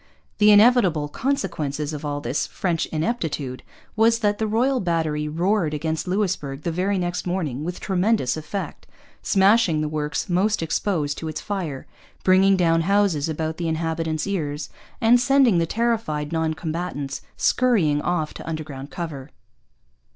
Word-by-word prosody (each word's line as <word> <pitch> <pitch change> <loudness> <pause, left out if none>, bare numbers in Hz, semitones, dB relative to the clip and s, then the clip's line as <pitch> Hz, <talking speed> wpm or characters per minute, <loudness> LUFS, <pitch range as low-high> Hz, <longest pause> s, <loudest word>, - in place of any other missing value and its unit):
The 210 0 +6
inevitable 205 -8 +5
consequence 170 - -2
of 150 0 -6
all 145 -1 -3
this - - -1
French 175 -4 -1
ineptitude 155 - -3 0.3
was 225 +1 +4
that 205 -2 0
the 220 - 0
Royal 250 +5 +1
Battery 160 -5 -1
roared 170 0 0
against 160 +3 -2
Louisbourg 180 -8 -2
the 170 - -1
very 190 +4 0
next 175 0 -2
morning 155 -7 -2
with 175 +2 -4
tremendous 190 - +1
effect, 160 +6 -6 0.3
smashing 195 -5 +3
the 155 - -1
works 150 -1 -2
most 190 +2 +1
exposed 160 -3 -1
to 160 - -5
its 155 0 -4
fire, 170 -10 -4 0.4
bringing 190 +1 +5
down 165 -2 +3
houses 185 -5 +2
about 160 0 -3
the 170 - -2
inhabitants' 160 -1 -1
ears, 150 -7 -3 0.3
and 240 0 +5
sending 250 -6 +4
the 165 - 0
terrified 215 -10 -1
non 160 -1 0
combatants 155 -4 -4 0.2
scurrying 185 -13 +2
off 160 -3 -1
to - - -8
underground 145 -4 -6
cover. 160 -6 -6
165 Hz, 145 wpm, -23 LUFS, 150-200 Hz, 0.4 s, The